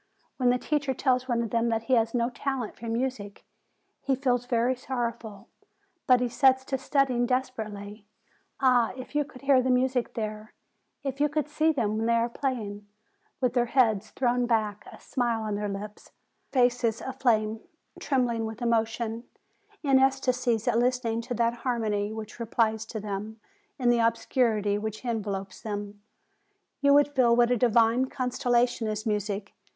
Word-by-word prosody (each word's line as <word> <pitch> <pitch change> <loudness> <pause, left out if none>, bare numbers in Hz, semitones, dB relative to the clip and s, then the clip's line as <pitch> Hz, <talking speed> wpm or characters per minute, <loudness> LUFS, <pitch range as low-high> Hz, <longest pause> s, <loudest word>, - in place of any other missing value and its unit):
When 250 -2 +3
the 250 - +3
teacher 280 0 -1
tells 255 -1 +1
one 235 -2 +1
of 230 - -5
them 235 0 +1
that 225 0 -1
he 260 - 0
has 230 -1 +2
no 235 +1 +1
talent 260 -3 -3
for 230 - -9
music, 230 -3 -3 0.6
he 270 - +1
feels 245 -2 0
very 245 +1 +1
sorrow 245 -2 -2
ful, 215 -4 -12 0.6
but 255 -1 +6
he 250 - +1
sets 260 +1 +3
to 265 -1 -2
studying 255 -4 +1
desperately. 215 -5 -4 0.5
Ah! 250 -4 +3
if 255 +2 -9
you 295 0 +2
could 275 -3 -14
hear 275 -2 +5
the 260 - -1
music 250 -1 +1
there, 215 -1 -5 0.5
if 275 0 -3
you 295 - +3
could 295 0 -1
see 310 +2 +2
them 220 -7 -1
when 225 - -1
they 235 - +3
are 230 +1 +1
playing, 215 -6 -4 0.5
with 250 -2 +1
their 240 -1 +2
heads 225 -6 +2
thrown 245 -1 0
back, 215 -3 -1
a - - -13
smile 235 -3 -1
on 215 -1 -2
their 205 0 -2
lips, 205 +1 -8 0.4
their 255 -3 +4
faces 245 -2 +1
aflame, 225 -5 0 0.4
trembling 245 -5 0
with 220 +1 -7
emo 235 -2 +3
tion, 225 +1 -5 0.6
in 275 -2 +4
ecstasies 255 -4 +1
at 230 - +3
listening 240 -2 0
to 245 +1 -5
that 235 +1 +1
harmony 215 -5 -1
which 220 +1 -8
re 230 - -4
plies 220 -1 0
to 225 - -5
them 210 +2 -5 0.4
in 250 -3 +3
the 240 - +2
obscurity 230 -3 +1
which 220 +3 -5
envelops 200 -5 -3
them, 205 -1 -5 0.8
you 280 0 +4
would 290 0 +5
feel 240 -3 +4
what 240 0 +4
a - - +4
divine 235 +1 +3
consolation 245 -3 0
is 215 +1 -3
music! 205 -2 -2
235 Hz, 175 wpm, -27 LUFS, 220-255 Hz, 0.8 s, but